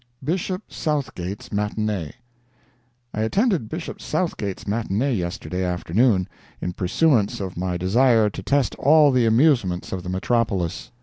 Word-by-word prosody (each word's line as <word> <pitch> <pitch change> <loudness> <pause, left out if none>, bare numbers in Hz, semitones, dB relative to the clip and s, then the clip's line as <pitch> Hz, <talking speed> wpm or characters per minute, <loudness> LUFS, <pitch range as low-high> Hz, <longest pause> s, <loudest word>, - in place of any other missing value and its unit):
"BISHOP 185 +6 -2
SOUTHGATE'S 105 - -3
MATINEE" 105 -5 -2 1.0
I 110 - -2
attended 180 - +1
Bishop 160 +4 -6
Southgate's 105 - -2
matinee 115 +5 0
yesterday 90 -1 -3
afternoon, 95 +3 +1 0.3
in 90 - -3
pursuance 105 - +2
of 95 -2 -5
my 90 0 -2
desire 110 +5 +3
to 95 - -5
test 140 +7 +1
all 150 0 +6
the 125 -3 +3
amusements 115 - +2
of 95 - -3
the 90 - -7
metropolis. 100 0 -1
110 Hz, 125 wpm, -23 LUFS, 95-135 Hz, 1.0 s, all